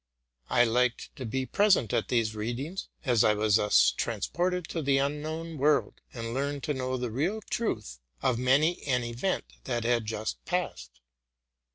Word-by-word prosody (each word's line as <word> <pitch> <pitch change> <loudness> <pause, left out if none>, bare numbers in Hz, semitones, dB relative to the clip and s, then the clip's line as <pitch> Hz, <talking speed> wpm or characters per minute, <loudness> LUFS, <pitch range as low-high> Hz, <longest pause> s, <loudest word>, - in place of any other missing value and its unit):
I 120 - +5
liked 120 +1 0
to 130 - -5
be 130 +4 -1
present 195 - +3
at - - +1
these 115 -3 +1
readings; 120 - -4 0.2
as 120 -5 +4
I 105 - +4
was 105 0 +3
thus 105 -1 +4
trans - - -2
ported 180 0 -1
into - - 0
an 140 -3 +2
unknown 155 +3 -2
world, 150 +2 +2
and 115 -1 -5
learned 140 +1 -2
to 150 - 0
know 130 -1 -2
the 125 -2 -3
real 165 - 0
truth 110 - -2 0.2
of 120 - +1
many 140 +7 +3
an 125 -3 +2
event 120 +11 -2 0.2
that 120 -3 -1
had 115 -1 +1
just 110 0 -4
passed. 65 - -3
130 Hz, 170 wpm, -29 LUFS, 115-155 Hz, 0.2 s, I